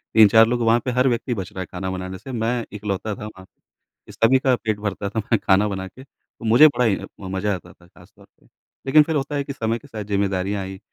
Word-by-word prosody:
3-4 110 +1 +7
लोग, 120 0 -1
वहाँ 115 +1 +3
पे 125 - 0
हर 125 +2 +2
व्यक्ति 120 +1 -1
बच 95 -3 -6
रहा 95 - -7
है - - -4
खाना 95 +1 -4
बनाने 95 0 -5
से। 135 - -10
मैं 115 0 -1
इकलौता 105 0 -3
था 105 - -8
वहाँ, 95 -3 -11 0.6
जो - - -11
सभी 130 +3 +3
का 130 -2 +2
पेट 110 -3 -3
भरता 100 -1 -3
था 110 - -3
मैं 110 0 0
खाना 100 +2 +3
बना 95 -2 -4
के। 130 +7 -14
तो 115 - -17
मुझे 120 +8 +7
बड़ा 125 -4 +1
ही 100 -4 +3 0.3
म 95 - -7
मज़ा 100 +2 0
आता 90 0 -11
था 85 - -22
खासतौर 100 +3 -20
पे। - - -28 0.4
लेकिन 150 +3 +6
फिर 160 0 -3
होता 145 +1 -2
है 140 - -1
कि 140 0 -6
समय 115 -2 -2
के - - -17
साथ 110 -2 -6
ज़िम्मेदारियाँ 100 -1 -1
आईं, 95 0 -7
105 Hz, 255 wpm, -22 LUFS, 95-120 Hz, 0.6 s, 3-4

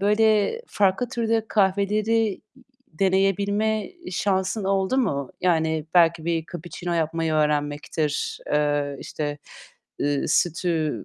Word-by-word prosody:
böyle 215 - +3
farklı 200 - +1
türde 225 -1 0
kahveleri 210 +2 +1 0.5
deneyebilme 200 +4 +1 0.2
şansın 190 +2 0
oldu 195 +5 +1
mu? 140 - -1
Yani 160 -3 +1
belki 170 -2 +4
bir 165 -1 -1
kapuçino 175 +1 -6
yapmayı 165 0 0
öğrenmektir, 150 0 -1
eee, 145 -1 +1
işte, 145 -1 -4 0.6
ııı, 145 -1 0
sütü 160 - 0
180 Hz, 100 wpm, -24 LUFS, 155-205 Hz, 0.6 s, belki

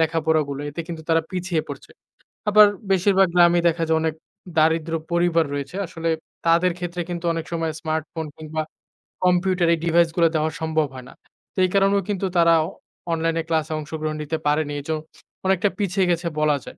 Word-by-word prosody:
লেখাপড়াগুলো 155 -3 +1
এতে 155 +3 -5
কিন্তু 165 -2 -6
তারা 165 0 +4
পিছিয়ে 180 -3 -1
পড়ছে। - - -9 0.6
আবার 210 0 +8 0.2
বেশিরভাগ 195 0 +4
গ্রামেই 175 -1 +5
দেখা 165 0 0
যায় 160 0 +3
অনেক 160 -1 -1 0.4
দারিদ্র 160 +1 +2 0.2
পরিবার 170 -1 +3
রয়েছে। 145 +5 -5
আসলে 165 -1 -4 0.4
তাদের 170 +2 +4
ক্ষেত্রে 175 0 -4
কিন্তু 175 0 -5
অনেক 165 -1 -3
সময় 165 -1 -1
স্মার্টফোন 160 0 -3
কিংবা 155 0 -3 0.6
কম্পিউটার 180 -1 +2
এই 165 - -1
ডিভাইসগুলো 170 0 +3
দেওয়া 155 0 +1
সম্ভব 160 -2 +1
হয় 125 -1 -9
না। - - -13 0.4
তো - - -40
এই - - -1
কারণেও 195 0 +4
কিন্তু 195 -1 -1
তারা 170 0 +6 0.6
অনলাইনে 165 0 0
ক্লাসে 160 0 0
অংশগ্রহণ 155 0 -4
নিতে 160 +2 -2
পারেনি। 150 0 +1
এইজন্য 155 +2 -3 0.4
অনেকটা 190 +2 +2
পিছিয়ে 195 -1 +1
গেছে 170 0 -1
বলা 150 -1 +3
যায়। - - -11
165 Hz, 165 wpm, -23 LUFS, 155-175 Hz, 0.6 s, আবার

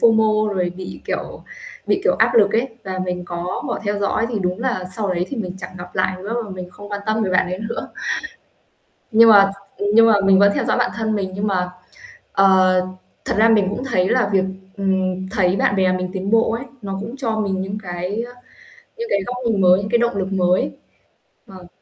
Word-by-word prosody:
FOMO 215 -2 +3
rồi 180 -2 0
bị, 185 -1 -8
kiểu - - -4 0.4
bị, - - +1
kiểu, - - +3
áp - - +3
lực 210 -3 +5
ấy 235 +4 +1 0.2
và 190 -1 -4
mình 180 -1 -3
có 175 +1 -4
bỏ - - -2
theo 205 0 -1
dõi 205 +3 0
thì 225 -4 -2
đúng 180 +1 -2
là 235 -7 -2
sau 210 -3 -1
đấy 175 +1 -1
thì 275 - -5
mình 185 -5 -3
chẳng 180 - -7
gặp 180 0 -10
lại 185 0 +1
nữa 215 +3 -4
và 205 - -10
mình 180 -1 -7
không 205 +3 -12
quan 205 0 -3
tâm 220 0 +1
về 190 - -1
bạn 185 0 +3
ấy 185 +1 -4
nữa. - - -5 1.2
Nhưng 225 +1 +7
mà 195 -2 +7 0.3
ừm, 205 - -2
nhưng 230 0 +7
mà 225 - +5
mình 195 -1 +5
vẫn 200 0 +5
theo - - 0
dõi - - +1
bạn - - +1
thân 220 -2 -1
mình 195 -2 -2
nhưng 200 +2 -2
mà 180 -3 0 0.6
ờ, 185 -1 +4 0.4
thật - - -1
ra 225 - +6
mình 210 -4 +4
cũng 230 +5 -4
thấy 190 -8 +1
là 200 - +2
việc, 190 -1 +3 0.3
ừm, 190 -1 -1
thấy 190 -3 +1
bạn 200 - +1
bè 185 -1 +3
mình 185 0 -2
tiến 195 +1 -3
bộ 225 0 +3
ấy, 235 +4 -3 0.2
nó 195 -1 -4
cũng 230 +5 -7
cho 225 -5 -2
mình 195 -2 -1
những 195 +2 -4
cái, 180 +4 -3
ơ, 245 - -8 0.7
những 465 - -4
cái 200 - +2
góc 250 - -3
nhìn 205 -4 +1
mới, 180 0 +6
những 200 +1 -4
cái 235 - +3
động 235 -3 0
lực 190 0 -2
mới. 180 -1 +2 0.8
Vâng. 185 -2 -12
195 Hz, 230 wpm, -20 LUFS, 185-220 Hz, 1.2 s, Nhưng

